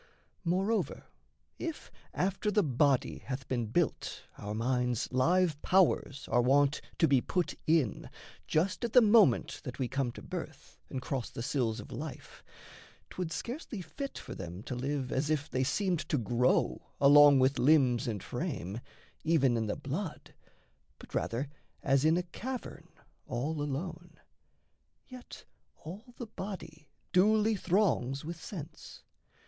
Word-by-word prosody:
Moreover, 195 +6 0 0.6
if 330 -2 -5 0.2
after 195 +3 0
the 210 0 +3
body 140 -1 +2
hath 135 0 -6
been 120 -3 -1
built 160 +9 -1
Our 105 +1 -5
mind's 125 0 0
live 165 +3 +2
powers 180 -7 +2
are 120 - +4
wont 140 +3 +3 0.2
to 165 - +4
be 135 -3 +4
put 180 +5 -1
in, 155 -9 +1 0.4
Just 180 +9 0
at 235 - -2
the 250 - +9
moment 210 - +4
that 125 - -6
we 130 - -1
come 130 -1 -1
to - - -10
birth, - - -8
And 130 -1 -4
cross 130 -2 -3
the 115 - -6
sills 120 -5 0
of 105 - -10
life, 155 -1 -8 0.7
'twould 180 -3 -4
scarcely 240 - -5
fit 275 - -6
For - - -7
them 90 +2 -7
to - - -5
live 135 +1 -2
as 140 +3 0
if 150 -2 0
they 130 +1 0
seemed 180 +5 0
to 150 - +2
grow 120 - +1 0.2
Along 145 0 +8
with 130 +1 +3
limbs 125 -3 +4
and 105 -5 -3
frame, 95 +7 -4 0.4
even 145 -6 +3
in 110 -1 -1
the 105 - -1
blood, - - -5 0.6
But - - -14
rather 125 +5 -1 0.4
as 135 0 +3
in 160 +2 +4
a 180 - 0
cavern 250 +8 -6 0.4
all 145 +5 -2
alone. 165 +4 -5 0.9
(Yet 255 -1 -11 0.4
all 215 +10 -9
the 240 - -5
body 165 -7 -8 0.3
duly 215 +3 +4
throngs 170 - +1
with 165 0 -6
sense.) 165 -4 -9
145 Hz, 145 wpm, -31 LUFS, 130-180 Hz, 0.9 s, the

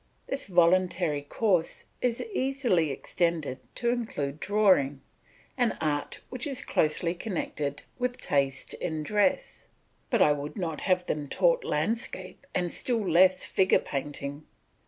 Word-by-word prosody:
This 275 - -3
voluntary 175 -3 +3
course 180 +3 0 0.2
is 240 -2 0
easily 260 - +1
extended 155 -1 -1 0.2
to 240 - 0
include 155 - -2
drawing, 185 -10 +3 0.6
an 240 -3 +2
art 145 -2 -2
which 255 +2 -3
is 270 -2 -4
closely 165 +2 +1
connected 155 -7 -3 0.2
with 250 0 -1
taste 135 -1 0
in 160 -2 -3
dress; 210 - 0 0.4
but 235 - +2
I 150 - +6
would 145 +5 -3
not 165 -5 -3
have 185 -2 +1
them 150 -3 -2
taught - - +2
landscape 235 +4 -3
and 175 -2 0
still 230 -5 -1
less 185 +2 +5
figure 190 0 +3
painting. 145 +1 -5
180 Hz, 130 wpm, -28 LUFS, 150-225 Hz, 0.6 s, I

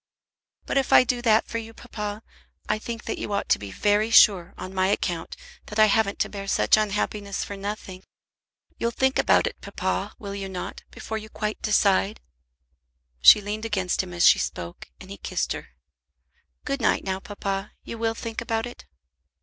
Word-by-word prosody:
"But 275 - +1
if 270 - -2
I - - +8
do 245 -1 -1
that 225 -1 +3
for 230 - -3
you, 225 0 -10
papa, 210 -2 -6 0.4
I 215 - 0
think 230 0 -6
that - - -3
you 205 - -4
ought 200 - -2
to - - +4
be 100 - -7
very 210 - +1
sure, 195 -6 +5
on 185 - -7
my 185 0 +2
account, 175 -4 -2 0.3
that 210 - -6
I 215 - +7
haven't 215 -1 +2
to - - +2
bear 195 -1 -7
such - - +4
unhappiness 205 -1 -1
for 200 - -6
nothing. 195 -2 -6 0.8
You'll 235 - +1
think 265 +2 +1
about - - +4
it, - - -5
papa, - - -3
will 200 -2 -7
you 195 -1 -5
not, 185 -1 -6
before 220 0 -5
you 215 0 -11
quite 210 0 -4
decide?" 205 0 +2 1.0
She 210 - +9
leaned 210 +2 -4
against 195 -5 0
him 185 -1 -8
as 175 0 +2
she - - +7
spoke, 85 +8 -5
and 190 - -12
he 200 - -7
kissed - - -2
her. - - -8 1.0
"Good 275 -2 -2
night, 225 - +2
now, 190 0 -2
papa. 195 0 -4
You 230 - -7
will 225 0 0
think 230 0 -5
about 225 -1 -1
it?" 245 - -10
210 Hz, 190 wpm, -25 LUFS, 195-225 Hz, 1.0 s, She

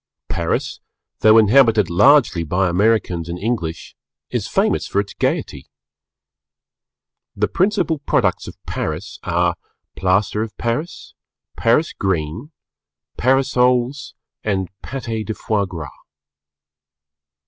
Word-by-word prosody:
Paris, - - -2 0.4
though 110 +1 +6
inhabited 110 -2 +5
largely 115 - +4
by 90 +4 0
Americans 90 -3 +1
and 85 - -4
English, 90 -6 -3 0.4
is - - -2
famous - - 0
for 100 - 0
its 100 0 -3
gaiety. 70 - -2 1.7
The - - +1
principal 175 -4 0
products - - 0
of - - -10
Paris 80 +5 -4
are 85 0 0 0.4
Plaster 95 +3 +1
of 110 -1 -5
Paris, 130 +9 -4 0.4
Paris 120 +8 +2
Green, 95 - -2 0.7
Parasols 130 +1 +1 0.3
and 95 -4 -1
Pâté 115 -4 -4
de 110 0 -5
fois 105 -3 -1
gras. 85 -5 -6
110 Hz, 105 wpm, -20 LUFS, 90-125 Hz, 1.7 s, though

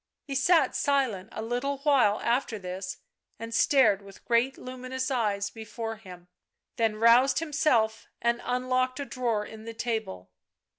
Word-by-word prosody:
He 280 - -5
sat 280 +1 +3
silent 260 -10 0
a 220 - -5
little 245 +5 -2
while 260 -8 +4
after 235 -1 0
this 185 -1 -6 0.4
and 230 +1 -7
stared 230 - +4
with 200 -1 -15
great 240 +3 +2
luminous 255 +1 -5
eyes 205 -5 0
before 225 0 -6
him, 180 -4 -13 0.5
then 225 -2 +1
roused 235 +4 +5
himself 285 -8 +1
and 235 0 0
unlocked 255 +1 0
a 280 - -3
drawer 235 -6 -1
in 220 0 -11
the 230 0 -7
table. 220 - -4
235 Hz, 145 wpm, -28 LUFS, 215-260 Hz, 0.5 s, roused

